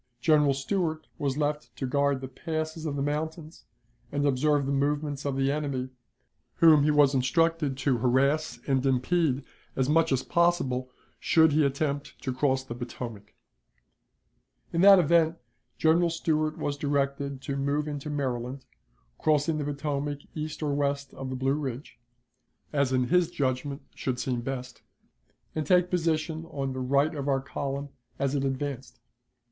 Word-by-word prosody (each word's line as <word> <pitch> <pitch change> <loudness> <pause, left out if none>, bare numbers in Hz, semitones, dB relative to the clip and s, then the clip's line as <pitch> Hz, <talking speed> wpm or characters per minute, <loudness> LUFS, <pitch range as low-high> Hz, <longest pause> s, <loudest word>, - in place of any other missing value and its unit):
General 150 +1 +4
Stuart 160 +2 -1
was 140 -1 -1
left 150 0 -2
to 135 - -3
guard 140 0 +1
the 130 - -5
passes 155 +3 -4
of 145 - -2
the 140 - -1
mountains 155 +2 -4 0.5
and 145 0 0
observe 145 +1 +2
the 140 - -1
movements 145 0 -1
of 140 - -1
the 135 0 +1
enemy, 140 -3 -2 0.7
whom 160 -3 +6
he 150 - +3
was 145 -2 +5
instructed 150 +1 +1
to 135 -3 +1
harass 135 +6 +1
and 135 -2 +1
impede 135 +1 +1 0.3
as 130 -1 +1
much 160 +1 +3
as 130 -1 +1
possible 170 -8 +1 0.3
should 160 -1 +4
he 150 +1 +3
attempt 140 +1 -2
to 130 - -2
cross 130 0 +1
the 125 - -7
Potomac, 120 -4 -7 1.4
In 170 - +2
that 195 0 +9
event 170 -1 +3 0.4
General 170 +2 +3
Stuart 155 -2 0
was 145 -1 -2
directed 140 -1 -1
to 140 - -3
move 140 +2 0
into 145 0 -5
Maryland, 130 -2 -3 0.5
crossing 155 0 +2
the - - -1
Potomac 145 0 -3
east 155 0 -5
or 145 -1 0
west 140 -1 -1
of 135 0 -6
the 130 - -3
Blue 135 +1 +1
Ridge, 140 -2 -5 0.7
as 140 -3 +2
in 125 -1 +1
his 180 -1 +3
judgment 140 -3 -2
should 125 -2 -3
seem 125 -2 -1
best, 125 0 -6 0.7
and 155 - -1
take 180 0 +4
position 160 -2 0
on 135 -4 -4
the 130 - -4
right 140 +5 +2
of 140 -2 -4
our 135 -1 +2
column 140 +1 -4 0.3
as 140 0 0
it 140 -2 0
advanced. 135 -1 -4
145 Hz, 155 wpm, -28 LUFS, 135-155 Hz, 1.4 s, that